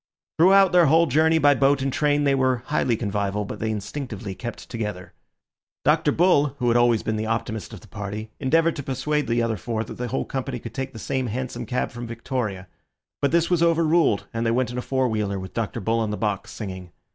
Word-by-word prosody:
Throughout 195 +2 +6
their 175 -3 +5
whole 165 +4 +5
journey 160 +3 +3
by 145 -2 +5
boat 140 0 +2
and 135 -1 -1
train 145 -1 +2
they 140 -1 +3
were 130 -2 +1
highly 130 -6 +1
convivial, 105 -1 -2
but - - -7
they 110 - -1
instinctively 110 -1 -5
kept 120 +5 -7
together. 105 -6 -5 0.7
Dr. 150 +1 +3
Bull, 145 -5 +3
who 125 -2 +1
had 115 - +2
always 120 -2 +3
been 110 - -1
the 110 +1 -2
optimist 110 -1 -3
of 105 - -10
the - - -16
party, 105 +1 -6
endeavoured 165 +4 +2
to - - -3
persuade 150 +3 -1
the 120 0 +1
other 115 -2 -1
four 110 +3 -3
that - - -9
the 125 - -2
whole 130 - -2
company 130 -1 -4
could 115 0 -9
take 135 -1 -4
the - - -9
same 130 +3 -2
hansom 125 +3 -4
cab 125 -1 -1
from 120 0 -7
Victoria; 115 -5 -4 0.5
but 140 - +3
this 170 +1 +2
was 175 -2 +3
over 165 -1 +3
ruled, 155 -10 +2
and 115 0 -1
they 115 - +1
went 120 +1 +1
in 125 - -6
a - - -2
four 130 0 0
wheeler, 105 -4 -1
with 95 0 -8
Dr. 115 0 -3
Bull 115 +3 0
on 110 -2 -1
the 105 - -3
box, 105 -3 -2
singing. 95 -4 -7
120 Hz, 225 wpm, -24 LUFS, 110-145 Hz, 0.7 s, Throughout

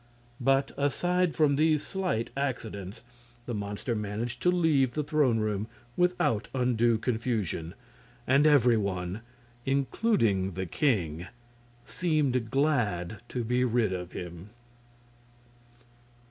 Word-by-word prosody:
But, 135 +2 +2
aside 175 +4 +1
from 150 -3 +3
these 155 -1 +2
slight 185 - -2
accidents, 115 -6 -4 0.4
the 120 - -4
monster 105 +3 -3
managed 110 +3 -3
to 180 - +3
leave 155 -8 +3
the 150 - -1
throne 145 -5 +2
room 105 -1 -1 0.3
without 180 -11 +1
undue 120 -2 +2
confusion, 110 -8 -2 0.5
and 140 +4 +4
every 125 -6 +5
one, 95 -1 -2 0.4
including 130 - +1
the 95 +2 -3
king, 90 - 0 0.6
seemed 145 -9 0
glad 110 - 0
to 125 - -2
be 125 +2 +1
rid 115 -5 +1
of 90 -1 -5
him. 90 +2 -7
120 Hz, 110 wpm, -28 LUFS, 105-140 Hz, 0.6 s, every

